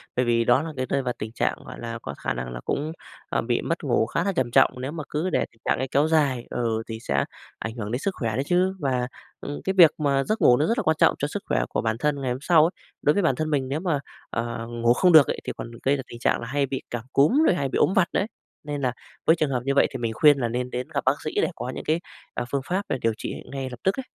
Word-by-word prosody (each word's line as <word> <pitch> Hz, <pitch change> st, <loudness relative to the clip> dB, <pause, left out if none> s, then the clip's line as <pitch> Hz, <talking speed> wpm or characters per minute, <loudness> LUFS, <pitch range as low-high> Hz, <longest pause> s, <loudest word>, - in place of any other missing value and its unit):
Bởi 125 Hz, -, +2 dB
vì 115 Hz, -1 st, +3 dB
đó 130 Hz, -, +4 dB
là 160 Hz, -2 st, -6 dB
cái 130 Hz, -, -1 dB
rơi 140 Hz, -, 0 dB
vào 125 Hz, -2 st, -2 dB
tình 110 Hz, +1 st, -5 dB
trạng, -, -, 0 dB
gọi -, -, -9 dB
là, 115 Hz, 0 st, -5 dB
có 70 Hz, -, -6 dB
khả -, -, -2 dB
năng 60 Hz, 0 st, -5 dB
là -, -, -5 dB
cũng, 150 Hz, +2 st, -1 dB, 0.4 s
à, -, -, 0 dB
bị 120 Hz, 0 st, 0 dB
mất 165 Hz, +1 st, -2 dB
ngủ 120 Hz, -5 st, +2 dB
khá 165 Hz, +9 st, -1 dB
là 200 Hz, -, +1 dB
trầm 130 Hz, -8 st, 0 dB
trọng. -, -, +5 dB
Nếu 135 Hz, -, -3 dB
mà 155 Hz, -1 st, -5 dB
cứ 160 Hz, +5 st, -1 dB
để -, -, +1 dB
tình 115 Hz, -, -29 dB
trạng -, -, +2 dB
ấy 130 Hz, +2 st, -2 dB
kéo 145 Hz, +4 st, +2 dB
dài, 140 Hz, -7 st, +2 dB
ừ, 115 Hz, -2 st, -1 dB
thì 110 Hz, -1 st, -5 dB
sẽ 70 Hz, -8 st, 0 dB, 0.3 s
ảnh 110 Hz, +1 st, -5 dB
hưởng 110 Hz, -3 st, -5 dB
đến 125 Hz, -, -1 dB
sức 195 Hz, -, -1 dB
khỏe 115 Hz, -5 st, -2 dB
đấy 135 Hz, -, 0 dB
chứ. 185 Hz, +2 st, +2 dB
Và, 125 Hz, -3 st, 0 dB, 0.3 s
ừm, 145 Hz, -, -5 dB
cái 190 Hz, -, 0 dB
việc 165 Hz, -4 st, +9 dB
mà 140 Hz, -2 st, +1 dB
giấc 215 Hz, +7 st, -1 dB
ngủ 125 Hz, -, +6 dB
nó 150 Hz, -, +2 dB
rất 230 Hz, -, +1 dB
là -, -, 0 dB
quan 160 Hz, -1 st, +2 dB
trọng -, -, +5 dB
cho 145 Hz, -, 0 dB
sức 200 Hz, +7 st, -5 dB
khỏe -, -, +1 dB
của -, -, -1 dB
bản 110 Hz, -1 st, 0 dB
thân 145 Hz, -1 st, 0 dB
ngày 130 Hz, -2 st, -1 dB
hôm 130 Hz, -, -4 dB
sau 155 Hz, 0 st, +5 dB
ấy, 175 Hz, -, 0 dB, 0.3 s
đối 150 Hz, -, +4 dB
với 200 Hz, -, +1 dB
bản 135 Hz, -6 st, +3 dB
thân 155 Hz, +2 st, -2 dB
mình 135 Hz, -3 st, 0 dB
nếu 145 Hz, +3 st, -1 dB
mà, 165 Hz, -6 st, 0 dB, 0.3 s
ờ, 115 Hz, 0 st, -3 dB
ngủ 120 Hz, 0 st, +2 dB
không 180 Hz, +7 st, +4 dB
được 155 Hz, -4 st, +8 dB
ấy, -, -, -2 dB
thì -, -, -4 dB
còn 115 Hz, -, -6 dB
gây 140 Hz, +2 st, +3 dB
ra 135 Hz, -, -5 dB
tình 120 Hz, -, -10 dB
trạng -, -, +1 dB
là 115 Hz, -, -5 dB
hay 140 Hz, +3 st, +1 dB
bị 135 Hz, 0 st, -4 dB
cảm 120 Hz, -2 st, -4 dB
cúm 240 Hz, -, +4 dB
rồi -, -, +4 dB
hay 140 Hz, -5 st, -1 dB
bị -, -, -1 dB
ốm 190 Hz, -, +3 dB
vặt 180 Hz, -3 st, +4 dB
nữa -, -, +2 dB
ấy. 205 Hz, -, -2 dB, 0.4 s
Nên 145 Hz, -1 st, -4 dB
là 125 Hz, -2 st, 0 dB, 0.3 s
với 160 Hz, -, +6 dB
trường 155 Hz, -4 st, 0 dB
hợp 125 Hz, -2 st, -1 dB
như 140 Hz, -, +1 dB
vậy -, -, +5 dB
thì -, -, -4 dB
mình 115 Hz, -2 st, -2 dB
khuyên 145 Hz, +4 st, +6 dB
là 120 Hz, -, 0 dB
nên 125 Hz, +2 st, -2 dB
đến 125 Hz, 0 st, -4 dB
gặp -, -, 0 dB
bác 135 Hz, +3 st, +2 dB
sĩ 155 Hz, -, -3 dB
để -, -, +2 dB
có 125 Hz, -, -5 dB
những -, -, -5 dB
cái, 160 Hz, +2 st, +1 dB, 0.3 s
à, 120 Hz, -, -2 dB
phương 140 Hz, -, 0 dB
pháp 190 Hz, +3 st, -1 dB
là -, -, 0 dB
điều 115 Hz, -1 st, +2 dB
trị -, -, -4 dB, 0.2 s
ngay 135 Hz, -1 st, -4 dB
lập 125 Hz, -2 st, -9 dB
tức 190 Hz, -, +2 dB
ấy. -, -, -3 dB
135 Hz, 310 wpm, -25 LUFS, 120-155 Hz, 0.4 s, việc